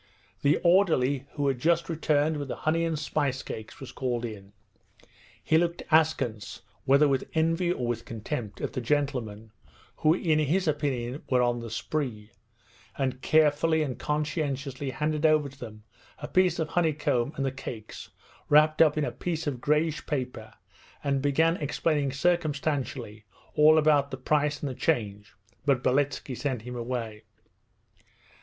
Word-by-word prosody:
The 145 +1 +3
orderly, 150 -7 +3
who 145 -2 -1
had 135 -3 0
just 170 +4 +2
returned 155 -1 +1
with 145 -1 -4
the - - -4
honey 165 +2 +2
and 165 -2 -1
spice 145 -3 -1
cakes, 110 0 -8
was 135 - -8
called 120 -3 -2
in. 100 -3 -8 0.9
He 160 - +3
looked 170 0 -1
askance 135 -10 +1 0.2
(whether 140 +3 +5
with 135 -2 -1
envy 165 +2 +2
or 125 -8 -2
with 120 -1 -2
contempt) 115 -1 -5
at - - -3
the 130 - -3
gentlemen, 120 -6 -2 0.5
who 155 +2 +3
in 160 -4 +1
his 165 +5 +1
opinion 140 -3 -1
were 125 -1 +3
on 120 0 +1
the 115 0 -7
spree; 115 -3 -4 0.7
and 130 -1 -2
carefully 155 +1 +3
and 130 -4 -4
conscientiously 145 -2 -2
handed 150 +3 -2
over 155 -2 +3
to 140 +1 -18
them 110 -3 -9 0.3
a - - -7
piece 185 -2 +2
of 160 -2 -2
honeycomb 150 -6 0
and 135 - -2
the 135 - 0
cakes 115 -4 -8 0.4
wrapped 155 +1 +5
up 155 -2 +5
in 150 - +1
a - - -3
piece 165 -2 -4
of 135 -5 -3
greyish 150 +1 0
paper, 125 -6 -4 0.5
and 140 -1 0
began 160 +5 +2
explaining 145 -1 0
circumstantially 140 -7 -1 0.3
all 155 +1 +6
about 150 -2 +3
the 130 - -5
price 145 +2 0
and 145 - -2
the - - -5
change, 105 - -2 0.3
but 135 -2 +1
Beletski 135 0 0
sent 130 -4 -3
him 125 +1 -7
away. 115 -3 -4
145 Hz, 155 wpm, -27 LUFS, 125-155 Hz, 0.9 s, all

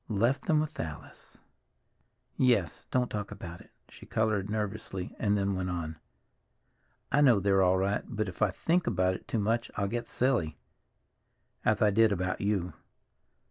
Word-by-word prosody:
"Left 115 +5 +1
them 155 -1 +3
with 155 0 -3
Alice!" 80 -2 -8 1.0
"Yes, 120 - +1
don't 125 -1 +1
talk 105 -1 -3
about 90 -4 -8
it." - - -18 0.2
She - - -14
colored 105 -3 0
nervously 105 -3 -4
and 105 -1 +2
then 100 0 0
went 95 -1 -2
on. 80 -3 -4 1.1
"I 145 - +4
know 125 -8 +6
they're 95 0 +3
all 95 0 +4
right, 100 +2 0
but 110 0 -2
if 90 - -8
I 110 - +4
think 165 - 0
about 95 -4 +2
it - - -8
too - - -1
much 115 +3 0
I'll 100 -1 0
get 120 +3 -3
silly—as 120 - -3
I 105 - +5
did 110 +1 +4
about 90 -1 -1
you. 100 -5 0
100 Hz, 160 wpm, -30 LUFS, 95-115 Hz, 1.1 s, know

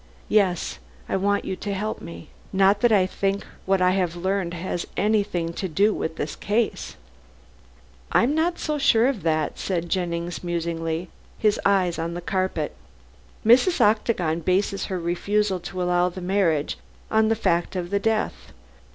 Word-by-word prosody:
"Yes. 190 -5 +1 0.3
I - - -1
want 200 +1 +1
you 190 - -2
to 200 +1 -3
help 215 +3 -3
me. 85 -3 -9 0.2
Not 195 +2 +3
that 240 - +4
I 195 -4 +5
think 195 +1 -2 0.2
what 190 -1 +3
I 180 - +4
have 180 -3 0
learned 185 -1 -1
has 175 0 -3
anything 200 -6 +1
to 190 - -3
do 200 +6 +2
with 160 - -3
the - - -2
case." 215 +2 -1 1.2
"I'm 250 +5 +3
not 335 +3 +1
so 300 -1 -2
sure 230 -4 +4
of 260 -6 0
that," 155 -2 0
said 175 -3 -2
Jennings 175 -1 -2
musingly, 170 0 -2 0.3
his 215 -1 +2
eyes 185 -4 +2
on 170 +1 -3
the - - -3
carpet. 185 -4 -2 0.7
"Mrs. 260 - +5
Octagon 210 -6 +2
bases 190 +3 0
her 185 -2 -3
refusal 190 +3 0
to 180 +1 -4
allow 180 0 +2
the 180 - -8
marriage 180 - 0 0.3
on 220 0 +4
the 225 - +2
fact 175 -4 0
of 180 0 -3
the 200 - +2
death. 220 +1 -1
190 Hz, 160 wpm, -24 LUFS, 170-210 Hz, 1.2 s, I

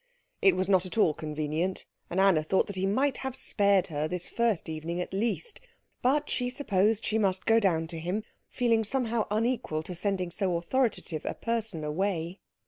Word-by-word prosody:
It 195 -2 +5
was 185 0 0
not 190 -2 +3
at 185 - -7
all 170 -8 +4
convenient; 155 +4 -2 0.2
and 180 - -1
Anna 190 -5 +5
thought 175 +5 +2
that 200 - -5
he 190 +1 0
might 260 +7 +1
have 265 -1 -4
spared 200 -6 +2
her 150 +1 0
this 180 +2 -2
first 235 -6 0
evening 160 +2 -4
at 180 - -4
least. 235 - -1 0.4
But 285 +4 +2
she 250 -1 0
supposed 220 -4 +1
that - - -2
she 220 - +1
must 190 -3 +1
go 225 0 +5
down 170 -6 +2
to 165 0 -7
him, 180 +6 -2 0.3
feeling 230 -3 +2
somehow 235 -1 0
unequal 215 -7 0
to 180 - -6
sending 185 0 -1
so 185 -1 0
authoritative 185 - -1
a - - -3
person 225 -8 -2
away. 170 +3 -2
195 Hz, 190 wpm, -29 LUFS, 170-225 Hz, 0.4 s, It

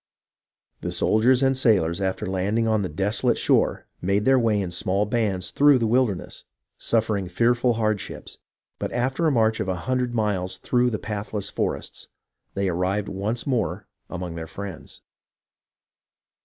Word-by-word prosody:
The - - -4
soldiers 125 +4 +3
and 135 0 +3
sailors, 100 -9 +2
after 95 -1 -1
landing 100 +5 0
on 110 -1 +2
the 95 - -2
desolate 105 +9 +1
shore, - - +2 0.2
made 100 +3 +1
their 135 0 +5
way 110 -3 +2
in 95 -3 -3
small 100 +3 +1
bands 105 -4 -1
through 145 -1 +5
the 115 - 0
wilder 120 -2 +2
ness, - - -9 0.4
suffering 110 -4 0
fearful 120 +6 +2
hardships; 110 -3 -3 0.4
but - - -3
after 130 +7 0
a - - +3
march 110 -3 +2
of - - -2
a 95 - 0
hundred 125 -2 0
miles 95 -4 -1
through 125 0 +1
the 110 - -2
pathless 105 -1 -4
forests, - - -3 0.5
they 100 0 0
arrived 95 +3 -1
once 105 +5 -3
more 120 -9 -1 0.2
among 90 -1 -5
their 80 -1 -6
friends. 95 0 -8
105 Hz, 155 wpm, -24 LUFS, 95-120 Hz, 0.5 s, their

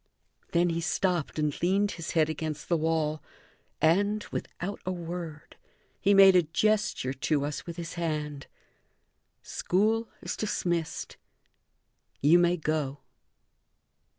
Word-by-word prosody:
Then 175 +1 +3
he 165 0 -1
stopped 175 -1 0
and 150 -2 -1
leaned 195 +4 +2
his 165 -1 -5
head 160 -2 +4
against 155 -1 -4
the 170 - +3
wall, 155 -1 0 0.6
and, 200 +6 +2
without 200 +4 -5
a 185 - -2
word, 170 -3 -6 0.4
he 200 0 +4
made 195 -1 +8
a 180 - +7
gesture 200 - 0
to 145 +1 0
us 145 +3 -5
with 170 0 -6
his 170 -2 -5
hand; 150 -4 -3 1.0
"School 220 +5 0
is - - -3
dismissed 175 -6 -2 1.0
you 160 +5 +6
may 175 0 +3
go." 150 -3 -2
170 Hz, 125 wpm, -28 LUFS, 155-185 Hz, 1.0 s, made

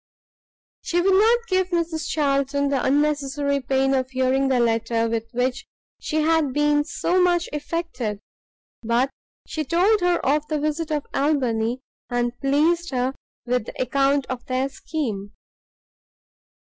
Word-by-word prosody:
She 345 - 0
would 380 +2 +3
not 460 +4 +4
give 375 -2 +1
Mrs 330 -3 -1
Charlton 280 -1 +1
the 275 -2 0
unnecessary 285 0 +1
pain 270 +1 +1
of 260 -1 0
hearing 260 +1 +1
the 260 -2 +2
letter 230 0 +1
with 225 0 -2
which 250 +2 -1 0.4
she 310 0 -1
had 320 -4 +2
been 295 0 +2
so, 360 +4 0
much 350 -1 +2
affected, 290 -8 -3 0.6
but 240 +4 +1 0.3
she 310 - -3
told 365 +8 +2
her 355 0 +3
of 300 +2 +1
the 305 -1 -1
visit 305 +2 -2
of 300 -2 -1
Albany, 250 -5 0 0.3
and 240 0 -1
pleased 315 +5 +2
her 255 0 -1 0.3
with 250 -2 -1
the - - -9
account 275 +2 +2
of 255 -2 -5
their 260 +1 0
scheme. 220 -10 -4
280 Hz, 140 wpm, -23 LUFS, 255-315 Hz, 0.6 s, not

